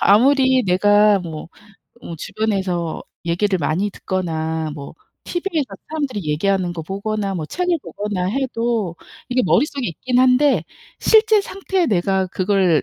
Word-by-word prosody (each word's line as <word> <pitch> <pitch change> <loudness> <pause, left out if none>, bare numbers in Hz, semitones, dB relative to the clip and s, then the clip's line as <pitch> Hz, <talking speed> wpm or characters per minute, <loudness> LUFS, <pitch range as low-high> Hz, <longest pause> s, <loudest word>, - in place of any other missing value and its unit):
아무리 260 +4 +4
내가 205 +2 +4
뭐 165 -4 -7 0.6
어 165 - -6
주변에서 185 -3 -2 0.2
얘기를 185 +3 +1
많이 170 +7 0
듣거나 160 -4 -3
뭐 140 -2 -8 0.3
TV에서 345 -5 -2 0.2
사람들이 280 -9 -3
얘기하는 185 +3 0
거 170 -2 -5
보거나 200 +3 -3
뭐 155 -3 -4
책을 360 - 0
보거나 205 -3 -3
해도 230 -5 -1 0.3
이게 255 0 +1
머릿속에 280 -1 +1
있긴 245 +10 -1
한데 260 +2 +4 0.3
실제 440 -1 +5
상태에 385 -2 -1
내가 190 - +1
그걸 185 -3 +2
205 Hz, 295 characters per minute, -20 LUFS, 175-260 Hz, 0.6 s, 실제